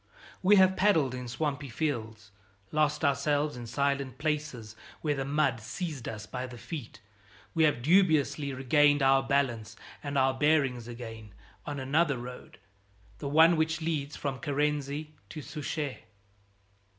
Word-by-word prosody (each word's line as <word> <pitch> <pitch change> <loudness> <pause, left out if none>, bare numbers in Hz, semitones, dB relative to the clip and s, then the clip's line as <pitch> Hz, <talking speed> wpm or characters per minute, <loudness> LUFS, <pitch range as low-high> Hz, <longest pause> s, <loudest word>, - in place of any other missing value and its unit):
We 195 +3 +6
have 190 -1 +5
paddled 165 -10 +3
in 125 -1 -5
swampy 140 +2 -3
fields, 110 -6 -3 0.4
lost 150 0 +1
ourselves 145 +1 +1
in 120 -1 -7
silent 140 0 -1
places 150 -8 -3 0.3
where 150 -2 +1
the 135 -1 -3
mud 140 -4 +1
seized 150 - -5
us 110 -1 -6
by 125 +2 -5
the 120 -1 -10
feet, 120 -5 -8 0.5
we 160 -1 +4
have 130 -6 +1
dubiously 155 -4 +3
regained 145 +2 +3
our 135 0 +5
balance 125 -5 0 0.3
and 140 -1 -3
our 135 0 +3
bearings 135 -4 +1
again 115 -4 -9 0.3
on 145 -1 -3
another 145 +2 +1
road, 125 +1 -9 0.6
the 140 - -4
one 160 +3 +6
which 160 0 +1
leads 155 -3 -2
from 135 -3 -3
Carency 150 0 -1 0.2
to 155 +2 -7
Souchez. 150 -2 -4
140 Hz, 140 wpm, -29 LUFS, 125-155 Hz, 0.6 s, We